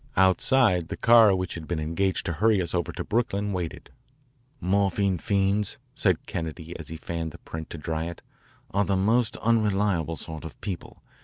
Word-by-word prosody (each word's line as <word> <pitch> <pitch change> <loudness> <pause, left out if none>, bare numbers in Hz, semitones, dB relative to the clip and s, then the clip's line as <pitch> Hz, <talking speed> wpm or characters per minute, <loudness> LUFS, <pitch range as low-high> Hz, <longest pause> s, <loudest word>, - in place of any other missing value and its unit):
Outside, 95 0 +4
the - - -5
car 115 -4 +7
which 95 -1 -2
had 80 -2 -7
been 85 -3 -2
engaged 85 +5 -1
to 85 - -1
hurry 105 +4 +3
us 85 -3 -2
over 85 -2 0
to - - -5
Brooklyn 105 -3 0
waited. 90 -3 -5 0.7
"Morphine 100 -1 +1
fiends," 100 +1 +1 0.2
said - - +1
Kennedy 80 0 -5
as 80 - -8
he 80 - -6
fanned 85 0 -4
the - - -10
print 80 -1 -8
to - - -7
dry 80 +1 -3
it, 85 0 -7 0.3
" - - -30
are 100 +1 +2
the 100 -1 +1
most 115 +4 +2
unreliable 105 -7 +1
sort 80 0 -6
of 80 - -9
people. 95 -4 -6
95 Hz, 180 wpm, -26 LUFS, 80-105 Hz, 0.7 s, car